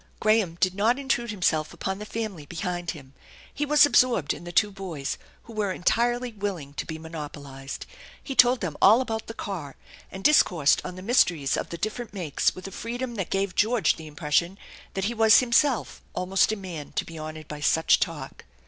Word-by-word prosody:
Graham 215 -6 +2
did 185 -1 +2
not 220 +6 +2
intrude 260 -4 -1
himself 160 -7 0
upon 190 +1 -3
the 210 - -7
family 210 -11 -5
behind 175 +2 -4
him. 135 -4 -7 0.4
He 295 - -2
was 300 0 +7
absorbed 245 - +3
in - - -10
the 175 - -6
two 205 +4 +3
boys, 175 -8 -5 0.2
who 230 - -12
were 210 -3 -1
entirely 240 +6 +1
willing 195 -9 -4
to - - -5
be 160 - -5
monopolized. 145 -4 -8 0.4
He 275 - -4
told 250 -1 +5
them 165 -5 -3
all 215 +5 +7
about 225 -3 -4
the 225 - -7
car, 170 -12 -6 0.4
and 190 - -8
discoursed 170 - +4
on 180 - -6
the 185 - -9
mysteries 175 - +2
of - - -3
the 170 - -5
different 215 +2 -4
makes 165 -7 0
with 185 - -9
a - - -8
freedom 240 +4 -4
that 195 -6 -4
gave 195 -1 -1
George 215 -5 +2
the 160 - -9
impression 155 +4 0 0.4
that 195 0 -1
he 230 - -1
was 220 -1 +6
himself 250 0 +2
almost 185 +3 +2
a - - -1
man 180 -7 -8
to - - -1
be 165 -1 -9
honored 155 0 -7
by 150 - -7
such 160 +3 +3
talk. - - -4
190 Hz, 195 wpm, -26 LUFS, 160-225 Hz, 0.4 s, was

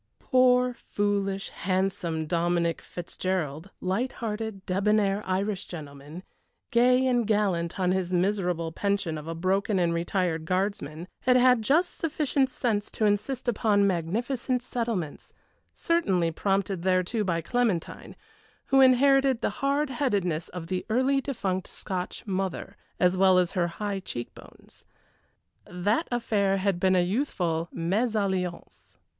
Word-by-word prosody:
Poor, 250 -1 +3
foolish, 200 -3 -2
handsome 185 -3 -1
Dominic 170 +1 0
Fitzgerald, 175 -2 -4
light 200 +8 -1
hearted, 220 -3 -5
débonair 200 +1 +1
Irish 195 +1 -1
gentleman, 150 +1 -9 0.5
gay 250 +2 +4
and 245 -4 +2
gallant 195 -5 0
on 180 -1 +2
his 185 -1 -1
miserable 180 -3 0
pension 200 -2 -1
of 155 0 -7
a 165 - -4
broken 190 +4 0
and 170 -2 +2
retired 170 -1 -1
Guardsman, 180 -3 -2
had 250 0 +3
had 250 -1 +5
just 315 +11 +1
sufficient 295 -4 +1
sense 220 -5 -1
to 220 - -1
insist 235 +6 0
upon 210 -3 +2
magnificent 230 +8 -1
settlements, 230 - -4 0.4
certainly 190 - +1
prompted 195 +1 -1
thereto 185 +4 +1
by 170 -4 0
Clementine, 220 -3 -2 0.5
who 270 0 +5
inherited 265 -1 +5
the - - 0
hard 280 +1 +1
headedness 195 - -1
of 180 -2 -7
the 180 +2 -3
early 260 +4 +2
defunct 195 -9 -3
Scotch 185 -1 -5
mother, 195 0 -3 0.2
as 180 0 +3
well 190 -1 +5
as 180 -1 +2
her 175 -2 0
high 200 +3 -3
cheek 120 -10 -6
bones. - - -15 0.8
That 205 - 0
affair 205 -5 +1
had 195 -2 0
been 185 0 +3
a 180 - +4
youthful 175 - -1
mésalliance. 190 -1 -2
195 Hz, 130 wpm, -27 LUFS, 175-235 Hz, 0.8 s, had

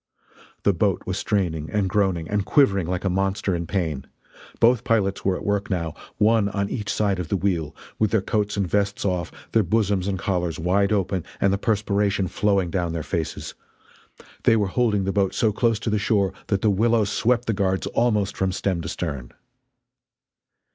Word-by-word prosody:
The 100 - +4
boat 95 +2 0
was 95 +2 -2
straining 80 -7 -1
and 105 -2 0
groaning 95 -4 0
and 105 +1 0
quivering 100 - +3
like 90 0 -2
a - - +3
monster 95 +1 0
in 85 -1 -4
pain. 80 -8 -2 0.5
Both 115 -1 +4
pilots 100 -4 +1
were 95 -1 +1
at - - -7
work 100 0 0
now, 85 -5 -2 0.2
one 110 -1 +3
on 100 0 -2
each 105 -5 -3
side 100 -3 0
of 90 - -3
the 100 - 0
wheel, 85 -6 -1 0.2
with 110 - +3
their 110 -2 +1
coats 105 -1 -1
and 100 -2 0
vests 100 +2 0
off, 90 -3 -1 0.2
their 115 - +4
bosoms 100 -1 +1
and 100 -1 -1
collars 90 -4 -1
wide 95 +5 +1
open 95 -3 0 0.2
and 100 0 +3
the 100 - -1
perspiration 100 -3 +1
flowing 100 -2 +1
down 85 -2 -1
heir 80 - -3
faces. 80 -2 -4 0.9
They 115 - +4
were 105 -3 +1
holding 110 -5 +2
the 95 0 -1
boat 100 -2 +1
so 110 - +2
close 115 +1 +1
to 115 - -1
the 105 - +1
shore 100 -2 +1
that 100 -2 0
the 105 - +4
willows 110 0 +2
swept 120 +2 +1
the 115 - 0
guards 95 -2 0
almost 105 -4 +1
from 95 -1 0
stem 90 -1 -1
to 85 - -5
stern. 70 -9 -4
100 Hz, 190 wpm, -23 LUFS, 90-105 Hz, 0.9 s, The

